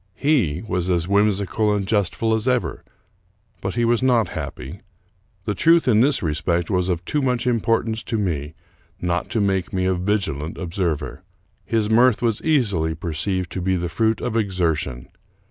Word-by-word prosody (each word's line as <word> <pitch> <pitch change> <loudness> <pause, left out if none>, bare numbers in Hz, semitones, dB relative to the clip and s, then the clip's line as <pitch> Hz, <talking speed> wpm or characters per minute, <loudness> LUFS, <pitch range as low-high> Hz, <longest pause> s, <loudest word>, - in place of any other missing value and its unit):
He 110 - +1
was 90 -2 -1
as 85 -2 +1
whimsical 100 +1 +2
and 100 -2 0
jestful 105 +2 +1
as 110 +2 -1
ever, 125 -1 0 0.8
but 95 +1 -3
he 120 -1 +2
was 120 +1 +2
not 125 -4 +3
happy. 75 +10 -7 0.6
The 105 - 0
truth 165 - +4
in 110 -3 +5
this 140 -4 +2
respect 85 +2 0
w^as 90 -2 0
of 85 -1 -2
too 150 - 0
much 125 -2 0
impor 115 -2 +1
tance 110 -1 -3
to 115 - -1
me 80 -7 -2 0.4
not 90 0 -1
to 115 - 0
make 95 -3 0
me 95 0 0
a 95 - +2
vigilant 90 -5 -2
observer. 85 -4 -3 0.5
His 110 -2 +1
mirth 120 +1 +4
was 115 -3 +1
easily 100 - +1
perceived 85 +1 -3
to 95 - -4
be 95 +1 +1
the 85 -1 -2
fruit 110 +6 0
of 120 - -2
exertion. 80 - -1
100 Hz, 170 wpm, -22 LUFS, 85-115 Hz, 0.8 s, in